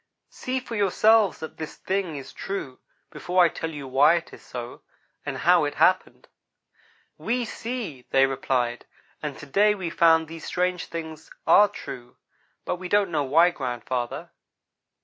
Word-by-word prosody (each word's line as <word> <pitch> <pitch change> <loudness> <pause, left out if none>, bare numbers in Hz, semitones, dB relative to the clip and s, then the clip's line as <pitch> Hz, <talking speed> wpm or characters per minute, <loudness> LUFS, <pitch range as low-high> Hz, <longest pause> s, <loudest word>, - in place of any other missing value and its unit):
"See 255 +1 -3
for 245 -2 -7
yourselves 210 0 +3
that 160 - -7
this 155 - -6
thing 190 -4 -2
is 135 -2 -8
true, 190 -10 -5 0.3
before 180 +1 +2
I 170 - +5
tell 165 - -5
you 145 -4 -7
why 140 +5 +5
it 170 - -4
is - - -12
so, 120 0 -8 0.5
and - - -3
how 175 -2 +4
it 145 - -2
happened." 185 0 +2 0.9
"We 240 +1 -1
see," 220 - -6
they 135 0 +5
replied, 125 -3 -1 0.4
"and 150 -2 -5
to - - -10
day 210 +8 +3
we 180 -4 -4
found 165 -1 +5
that - - -19
these 165 0 -9
strange 180 0 -1
things 160 -2 -7 0.2
are 210 - +7
true, 125 -11 -9 0.5
but - - -2
we 180 0 -7
don't 205 -2 +2
know 150 -3 0
why, 165 +6 +5
grandfather." 125 -4 -4
165 Hz, 165 wpm, -25 LUFS, 140-195 Hz, 0.9 s, are